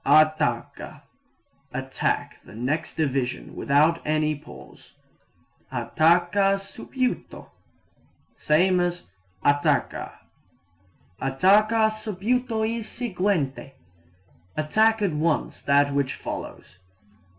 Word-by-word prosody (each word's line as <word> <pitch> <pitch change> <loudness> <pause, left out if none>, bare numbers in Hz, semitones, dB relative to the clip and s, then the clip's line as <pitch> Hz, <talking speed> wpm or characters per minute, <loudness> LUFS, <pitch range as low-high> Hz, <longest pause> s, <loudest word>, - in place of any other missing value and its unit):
Attacca 150 -5 +1 0.7
attack - - -2
the - - -14
next 145 +7 -2
division 135 -5 -2
without 155 +4 +2
any 155 0 +1
pause. 150 +1 -13 0.8
Attacca 175 +5 +2
subito 250 +5 -4 0.8
same 180 +4 +2
as 175 0 -2 0.3
attacca. 145 0 +1 1.1
Attacca 210 +11 +3
subito 220 +2 -1
il 230 0 -3
seguente 185 - -2 0.8
attack 215 +8 +2
at 195 - +1
once 155 0 -1
that 140 0 +3
which 140 -2 0
follows. 95 - -8
165 Hz, 80 wpm, -25 LUFS, 145-210 Hz, 1.1 s, Attacca